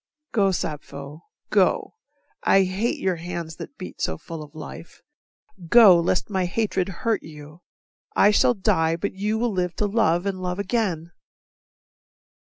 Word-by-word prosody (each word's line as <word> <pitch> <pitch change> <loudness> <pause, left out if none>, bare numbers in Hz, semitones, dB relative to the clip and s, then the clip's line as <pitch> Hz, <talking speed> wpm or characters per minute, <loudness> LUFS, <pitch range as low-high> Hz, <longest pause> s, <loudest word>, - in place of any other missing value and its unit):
Go 200 -4 +3
Sappho, 150 -3 -5 0.3
go - - +2 0.5
I 195 - +4
hate 190 +5 -1
your 185 -2 0
hands 170 -1 -6
that - - -9
beat - - -9
so 80 - -1
full 165 - -8
of 150 0 -12
life, 155 +1 -10 0.7
Go, 200 -3 +8
lest 175 +2 0
my 190 -3 -1
hatred 195 0 -1
hurt 220 +5 -1
you. 150 +1 -12 0.5
I 205 - +6
shall 240 +4 +3
die, 175 -6 +1
But 185 +4 -3
you 210 +3 -1
will 235 +1 0
live 180 -2 -1
to 210 - 0
love 195 -5 +1
and 190 -2 -2
love 180 0 -3
again. 190 -6 -1
180 Hz, 150 wpm, -24 LUFS, 165-205 Hz, 0.7 s, Go